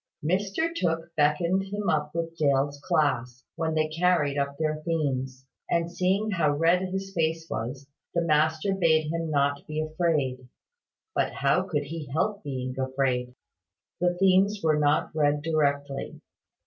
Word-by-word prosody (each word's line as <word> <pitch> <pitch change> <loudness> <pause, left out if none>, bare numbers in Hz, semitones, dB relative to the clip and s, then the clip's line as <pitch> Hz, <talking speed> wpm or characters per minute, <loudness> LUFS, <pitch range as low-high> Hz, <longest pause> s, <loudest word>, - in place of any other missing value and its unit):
Mr 200 - 0
Tooke 165 - -1
beckoned 170 +6 +2
him 205 +1 -4
up 150 0 0
with 165 0 -3
Dale's 140 -2 +1
class, 125 -7 0
when 160 -1 -1
they 155 0 +2
carried 160 -3 +1
up 140 0 -2
their 155 -1 0
themes; 135 -5 -2 0.2
and, 170 0 0
seeing 190 +4 +1
how 160 -6 +2
red 170 +3 +3
his 190 +1 -4
face 165 -1 0
was, 125 +5 -4 0.3
the 170 - +2
master 160 +4 +2
bade 160 -4 +2
him 165 -1 -2
not 140 -1 +1
be 155 0 -3
afraid. 155 -5 -1 0.7
But - - 0
how - - +2
could 150 -5 -1
he 155 +1 -6
help 200 +7 0
being 130 -2 -4
afraid? 130 -2 -1 0.6
The 175 0 +1
themes 195 +2 +3
were 155 -2 +3
not 150 +1 +2
read 145 -1 +2
directly. 145 -3 -1
155 Hz, 150 wpm, -27 LUFS, 140-170 Hz, 0.7 s, red